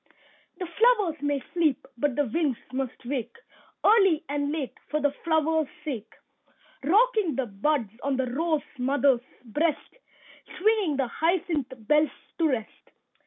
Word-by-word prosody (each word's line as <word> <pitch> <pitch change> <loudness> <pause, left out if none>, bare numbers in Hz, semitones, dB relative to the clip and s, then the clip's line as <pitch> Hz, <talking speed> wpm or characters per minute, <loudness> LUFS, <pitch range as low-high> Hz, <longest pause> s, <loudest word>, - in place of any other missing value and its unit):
The 370 - -3
flowers 385 - +2
may 290 -2 0
sleep, 305 -5 +1
but 270 +1 0
the 290 - +2
winds 275 0 0 0.2
must 260 -1 -4
wake 250 -2 -3 0.5
Early 390 -7 +5
and 285 0 -1
late, 300 -4 -3 0.2
for 305 - 0
the 290 -1 +2
flowers' 320 -1 +2 0.2
sake. 235 -8 -4 0.7
Rocking 415 - +3
the 265 - 0
buds 230 +2 0
on 275 -1 0
the 260 - +1
rose 305 +4 0 0.2
mother's 265 -1 +3 0.2
breast, 295 - -1 0.6
Swinging 405 -7 +2
the 270 - +2
hyacinth 320 0 0
bells 300 +7 +3 0.3
to 330 - +4
rest. 230 -5 -4
295 Hz, 135 wpm, -27 LUFS, 265-330 Hz, 0.7 s, Early